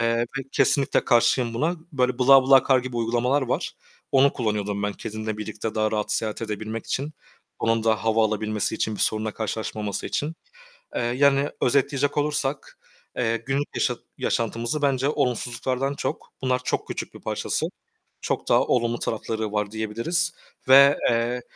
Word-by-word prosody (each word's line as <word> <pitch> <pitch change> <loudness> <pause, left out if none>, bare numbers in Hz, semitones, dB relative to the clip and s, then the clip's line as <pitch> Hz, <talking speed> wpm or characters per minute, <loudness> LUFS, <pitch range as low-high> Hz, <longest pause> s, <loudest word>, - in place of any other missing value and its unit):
eee, 115 0 +2
ve - - +2 0.3
kesinlikle 140 -2 +2
karşıyım 120 -1 +3
buna. 160 +9 0 0.2
Böyle, 125 -2 +1
"Bla 135 +1 +7
Bla 135 0 +6
Car" 135 -1 +6
gibi 125 -1 -5
uygulamalar 120 +4 +1
var. 125 - -1 0.4
Onu 135 +1 +5
kullanıyordum 105 -3 -2
ben 105 0 -1
kedimle 110 +1 -5
birlikte 110 +1 -5
daha 110 0 +1
rahat 105 -1 -1
seyahat 110 0 -2
edebilmek 110 +1 -4
için 145 +3 -2 0.5
onun 115 0 +1
da 110 -2 +1
hava 110 0 +3
alabilmesi 110 -1 -1
için 110 - -1
bir - - -7
sorunla 110 0 +1
karşılaşmaması 110 -1 -3
için. 150 +3 -2 0.6
Eee, - - -1
yani 140 +4 +2
özetleyecek 140 +2 +1
olursak, 145 -2 -2 0.4
eee, 115 -2 +1
günlük 135 +5 -2
yaşa - - 0 0.2
yaşantımızı 115 +5 -1
bence 135 -1 +2
olumsuzluklardan 130 +1 -1
çok, - - -4
bunlar 130 -1 +1
çok - - -2
küçük - - -5
bir - - -11
parçası, - - -2 0.5
çok - - -3
daha - - +5
olumlu 120 -1 +1
tarafları 110 -1 -3
var 105 -1 -1
diyebiliriz 115 +11 -1 0.4
ve, 140 +2 +8
eee, 120 +1 0
120 Hz, 155 wpm, -24 LUFS, 110-135 Hz, 0.6 s, ve